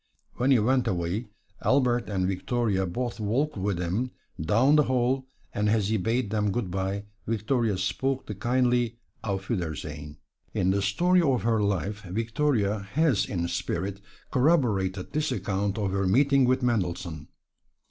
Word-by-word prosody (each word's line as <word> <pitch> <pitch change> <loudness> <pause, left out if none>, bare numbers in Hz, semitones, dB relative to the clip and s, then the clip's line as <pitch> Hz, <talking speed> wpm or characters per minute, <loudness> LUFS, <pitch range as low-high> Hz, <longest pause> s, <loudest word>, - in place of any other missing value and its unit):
When 125 +2 +1
he 135 - +6
went 125 +3 +2
away, 90 +6 -1 0.3
Albert 125 -4 +2
and 95 -3 0
Victoria 95 0 0
both 120 +6 -3
walked 125 +9 0
with 100 -1 -1
him 90 +9 -1 0.3
down 115 - +4
the 150 -1 +5
hall, 130 +1 +1 0.3
and 105 0 +1
as 105 -2 +2
he 110 - +2
bade 115 +2 0
them 105 -2 +1
good 105 -4 -2
by, 95 +2 -2 0.2
Victoria 115 -1 0
spoke 130 +9 -1
the 105 - -5
kindly 120 +1 +1 0.3
"Auf 95 -2 -3
wiedersehen." 75 -6 -4 0.4
In 90 - +2
the 100 +1 +1
story 175 - +3
of 135 -6 +1
her 115 -2 +2
life, 100 +1 -1
Victoria 110 - 0
has 150 -8 +2
in 85 -3 -2
spirit 95 +3 -3 0.3
corroborated 110 - +2
this 155 -1 0
account 100 -4 -1
of 100 -3 -1
her 100 0 0
meeting 135 +5 +4
with 130 +1 +2
Mendelssohn. 90 -9 -1
110 Hz, 150 wpm, -27 LUFS, 95-125 Hz, 0.4 s, he